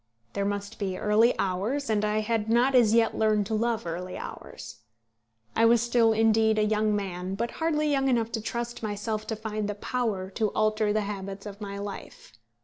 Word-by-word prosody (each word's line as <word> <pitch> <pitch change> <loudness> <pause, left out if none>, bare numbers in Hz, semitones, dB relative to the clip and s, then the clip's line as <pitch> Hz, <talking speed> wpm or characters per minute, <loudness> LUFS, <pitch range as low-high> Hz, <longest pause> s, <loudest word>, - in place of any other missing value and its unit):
There 200 - -1
must 200 +2 -4
be 190 -3 -2
early 215 +4 +3
hours, 210 +10 -1
and 215 -1 +1
I 210 +1 +1
had 220 0 -1
not 245 +4 +3
as 230 -3 +5
yet 230 -1 +3
learned 215 -2 +2
to 220 - -4
love 230 -1 0
early 180 +2 -5
hours. - - -9 0.8
I 225 - +4
was 235 0 +5
still, 235 -1 +3
indeed, 220 0 +3
a 215 - +3
young 215 0 +1
man; 190 -2 -3
but 235 +3 -2
hardly 305 -2 +1
young 270 -1 +2
enough 230 -2 +1
to 225 - -2
trust 235 +2 -4
myself 215 0 -3
to 220 - -2
find 215 -1 -4
the 205 - -3
power 205 -4 -2
to 215 +1 0
alter 215 0 +1
the 215 +1 +1
habits 200 -1 -6
of 205 0 -9
my 200 -1 -5
life. 200 - -8
215 Hz, 195 wpm, -27 LUFS, 205-230 Hz, 0.8 s, as